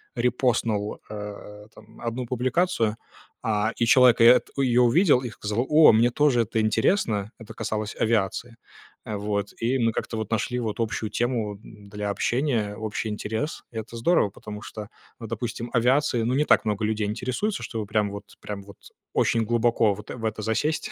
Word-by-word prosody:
Репостнул, 120 -4 0
э, 105 0 -8
там, - - -16
1 120 +2 -3
публикацию, 125 -1 0 0.5
а, 110 0 +1
и 115 - +2
человек 125 +1 +6
и - - +8
эт 120 +2 +6
ее 125 -3 +3
увидел 125 +3 +4
и 125 - -4
сказал: 105 +2 -2
"О, 155 +1 +8
мне 115 +2 +4
тоже 130 -1 +3
это 115 0 -1
интересно". 110 - +1
Это 110 0 -10
касалось 110 -1 -3
авиации. 115 +1 0 0.5
Э, 110 - -4
вот. 100 0 -2
И 120 +4 +1
мы 115 -1 +2
как-то 115 - -4
вот 110 -1 -4
нашли 120 +3 -1
вот 110 -2 -3
общую 110 -1 -2
тему, 115 -4 -1
м, 105 -2 -14
для 105 0 -4
общения, 115 -1 0
общий 110 0 -4
интерес. 110 +8 -4
Это 110 0 -7
здорово, 115 - +3
потому 105 +1 -9
что, 105 -2 -8 0.3
ну, 115 - -7
допустим, 115 +1 -4
авиацией, 125 0 +2
ну, 120 - 0
не 150 +2 +2
так - - +4
много 105 -1 -1
людей 105 0 -1
интересуется, 130 - -2
чтобы 110 -2 -4
прям 105 0 0
вот 100 0 -7 0.2
прям 100 -1 -6
вот 100 -1 -14 0.4
очень 115 -1 +2
глубоко 115 -1 +2
вот 105 +2 -11
в 115 -2 -6
это 110 -1 -2
засесть. 115 +9 -1
115 Hz, 175 wpm, -25 LUFS, 105-125 Hz, 0.5 s, и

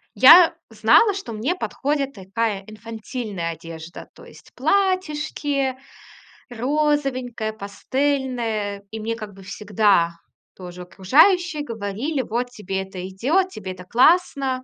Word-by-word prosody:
я 335 +7 +8
знала, 425 -3 +4
что 380 - -6
мне 245 +11 -1
подходит 280 -4 -2
такая 200 0 -3
инфантильная 215 -4 -6
одежда, 165 +1 -10
то - - -14
есть - - -16
платьишки, 300 -8 0 0.7
розовенькая, 255 -3 -1
пастельная. 225 -1 -2
И 220 - -6
мне 225 +1 -2
как 215 -3 -8
бы 195 0 -14
всегда 200 -4 +1 0.4
тоже 180 -1 -9
окружающие 305 - +3
говорили: 230 +4 -3
"Вот, 245 +2 -3
тебе 195 -4 -4
это 185 -1 -8
идёт, 285 - 0
тебе 195 - -7
это 180 0 -11
классно". 265 - +2
230 Hz, 115 wpm, -22 LUFS, 200-290 Hz, 0.7 s, я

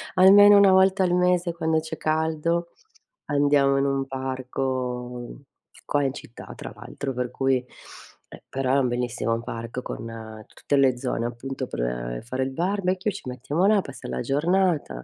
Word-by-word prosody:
almeno 205 +2 +8
una 200 -1 +6
volta 190 +1 +4
al 180 -1 +1
mese 180 -1 +2
quando 160 -1 0
c'è 160 0 -6
caldo 160 +2 0 0.6
andiamo 140 -1 +3
in 135 - +2
un 135 -1 0
parco 130 - -4 0.4
qua 145 -1 +1
in 135 -1 0
città 120 - -10
tra - - -8
l'altro, 135 -1 -6
per 125 0 -2
cui 135 -2 +1 0.7
e - - -12
però 135 0 0
è - - +4
un 130 - +2
bellissimo 120 -2 -2
parco 115 +1 -6
con 110 -2 -8
tutte 145 - -3
le 130 -2 +3
zone 120 -2 -2
appunto 130 +2 -5
per - - -3
fare 130 +3 -2
il 130 - -3
barbecue, 185 +5 -1
ci 175 - -9
mettiamo 135 +8 -1
là 210 +1 +5
a - - +2
passar 135 -8 -9
la - - -3
giornata. 150 - 0
135 Hz, 165 wpm, -24 LUFS, 125-170 Hz, 0.7 s, almeno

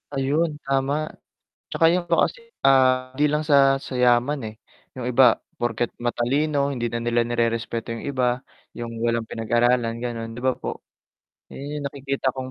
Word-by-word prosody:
Ayun 150 +4 +1
tama, 135 +3 0 0.6
'tsaka 165 - +3
yung 180 - +1
ano 170 - +3
kasi, 465 -2 -12 0.2
ah, 130 -1 +4
'di 145 +1 +2
lang 150 0 -1
sa, 135 -2 +5
sa 135 - -8
yaman, 125 +3 +3
eh, - - -15 0.4
yung 125 - -4
iba 125 -1 +5 0.2
porket 120 0 -1
matalino 140 +4 +1
hindi 120 - -3
na 120 - -1
nila 120 0 +1
nirerespeto 115 0 -1
yung 115 - -7
iba, 125 -1 0 0.3
yung 120 -1 -5 0.2
walang 115 0 +1
pinag-aralan 120 +1 +1
gano'n 115 -2 -4
'di 120 - -8
ba 130 -1 +1
po? - - -6 0.6
'Yan 145 +2 -6
yung 145 - -6
nakikita 135 -1 -2
kong 130 -1 -5
130 Hz, 165 wpm, -23 LUFS, 120-140 Hz, 0.6 s, sa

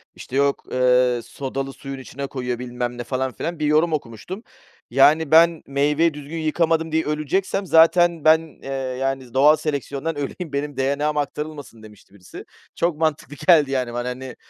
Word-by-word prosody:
işte, 130 - -9
yok, 140 0 +1
eee, 125 -1 +3
sodalı 135 0 -5
suyun 135 -1 -8
içine 140 +1 -7
koyuyor, 125 -3 -4
bilmem 125 -1 -4
ne, 120 - -4
falan 130 +1 -2
filan. 170 +3 -5
Bir 150 - 0
yorum 155 +2 +3
okumuştum. 155 - -5 0.5
"Yani, 145 +4 +4
ben 165 0 +5
meyveyi 150 +4 +1
düzgün 150 +2 -8
yıkamadım 160 0 0
diye 160 0 +1
öleceksem 155 +6 -1
zaten 170 -1 +4
ben, 160 +1 +6 0.2
eee, - - -7 0.3
yani, 135 -2 -3
doğal 145 +4 +6
seleksiyondan 145 +1 -3
öleyim, 145 +2 -5
benim 140 -1 -3
DNA'm 145 +3 0
aktarılmasın." 145 -5 -5
demişti 105 -2 -16
birisi. 95 -3 -12 0.3
Çok 170 -3 0
mantıklı 155 -2 -2
geldi, 150 -6 +6
yani, 125 -3 -1
bana, 120 +1 -3
hani, 130 +1 -7
145 Hz, 160 wpm, -22 LUFS, 130-160 Hz, 0.5 s, ben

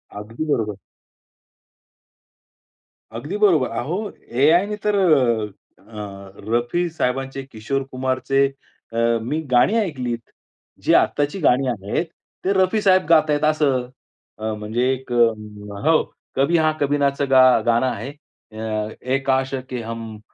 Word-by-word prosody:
अगदी 110 +8 -6
बरोबर. 105 -5 0 2.4
अगदी 150 - -4
बरोबर. 175 -11 +3
अहो, 175 - -3 0.2
AI 160 +8 +5
ने 210 - -3
तर 210 - +2
अ, 125 - +1
अ, 100 -3 -9 0.2
रफी 120 +10 +1
साहेबांचे, 135 -3 -2
किशोर 135 +2 -3
कुमारचे 130 +1 +1 0.5
अ, 115 - -4 0.2
मी 145 +7 -2
गाणी 125 - +4
ऐकलीत. 125 - -3 0.5
जे - - +3
आत्ताची 145 +6 +1
गाणी 135 -2 +3
आहेत, 105 - -2 0.4
ते 190 - +2
रफी 190 +3 +2
साहेब 185 -3 +4
गातायत 155 -2 +4
असं. 140 -5 +1 0.5
अ, 110 0 -3
म्हणजे 115 +4 -1
एक 130 -1 -5
हो, 110 +4 +1 0.3
कभी 140 +6 +3
हां 155 -1 +2
कभी 145 0 +1
नाच 140 0 0
गा 130 -1 +7 0.2
गाणं 120 +2 +3
आहे. 120 +2 -4
अ, 110 -6 -6
ए 130 +2 0
काश 130 0 +1 0.2
के 125 -2 -4
हम 115 -1 -7
130 Hz, 125 wpm, -21 LUFS, 115-155 Hz, 2.4 s, गा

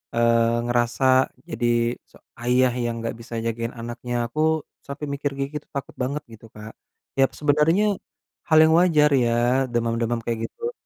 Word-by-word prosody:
eee, 115 0 +3
ngerasa 120 +1 0 0.4
jadi 135 -8 -2 0.4
se - - -21 0.3
ayah 125 +1 +3
yang 120 -1 -2
nggak 115 - -3
bisa 115 0 -8
jagain 115 0 -2
anaknya. 120 +1 -5
Aku 120 +6 -7 0.5
sampe 140 +2 -7
mikir 140 0 -2
kayak 140 0 -3
gitu, - - -32
takut 140 - -5
banget 140 +3 -3
gitu 115 0 -13
Kak. 105 +1 -9 0.5
Ya, - - +7 0.2
sebenernya 150 +6 +3 0.6
hal 160 -2 +4
yang 160 0 +4
wajar 155 -4 +4
ya, 120 - +1 0.4
demam-demam 115 0 0
kayak 115 -1 -2
gitu. 465 0 -5
120 Hz, 155 wpm, -23 LUFS, 115-145 Hz, 0.6 s, Ya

